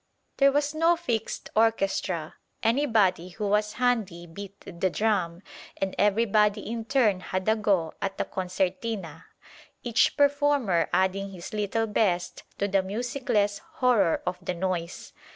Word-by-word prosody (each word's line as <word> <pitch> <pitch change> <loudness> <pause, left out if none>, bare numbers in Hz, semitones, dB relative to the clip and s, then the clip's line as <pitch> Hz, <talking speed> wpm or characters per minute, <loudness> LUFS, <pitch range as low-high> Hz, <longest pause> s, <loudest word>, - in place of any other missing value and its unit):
There 275 0 +5
was 290 +1 0
no 330 +2 +3
fixed 230 -9 -3
orchestra; 195 -7 +1 0.3
anybody 220 -8 +2
who 205 +3 -4
was 210 +1 +1
handy 225 -9 0
beat 200 +4 -10
the 185 +1 -2
drum, 185 -4 0 0.3
and 195 -1 -2
everybody 210 0 +3
in 225 +1 -5
turn 225 -7 +2
had 185 +1 -4
a 220 - +4
go 195 -7 +1
at 195 0 -3
the - - -1
concertina; 185 -2 -3 0.6
each 235 -2 +2
performer 285 - +2
adding 190 +1 +1
his 185 0 -9
little 215 +2 0
best 190 -5 0 0.2
to 200 - 0
the 195 -1 +2
musicless 210 0 -1
horror 230 -10 +2
of 180 0 -3
the 180 0 -2
noise. 175 -1 -3
205 Hz, 135 wpm, -27 LUFS, 185-230 Hz, 0.6 s, There